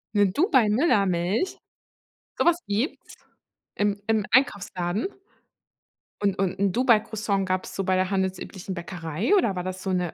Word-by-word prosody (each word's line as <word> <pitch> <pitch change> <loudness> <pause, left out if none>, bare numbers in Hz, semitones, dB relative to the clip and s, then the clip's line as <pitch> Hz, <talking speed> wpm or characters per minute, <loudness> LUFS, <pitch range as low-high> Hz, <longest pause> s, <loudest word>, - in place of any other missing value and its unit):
'Ne 205 -1 +5
Dubai-Müllermilch? 215 - +2 0.8
Sowas 345 0 +4
gibt's? 215 +9 -3 0.6
Im 205 0 0
im 220 -2 +1
Einkaufsladen? 200 - +1 1.1
Und 200 -2 +1
und 190 -1 -1
'n 200 -2 +2
Dubai-Croissant 215 -4 +1
gab 185 0 -1
es - - -9
so 195 - -1
bei 185 0 +1
der 185 +1 0
handelsüblichen 190 0 -3
Bäckerei 170 - -2
oder 215 - +2
war 180 - -3
das 185 0 -5
so 195 - -4
'ne 180 -2 -1
195 Hz, 135 wpm, -25 LUFS, 185-220 Hz, 1.1 s, Ne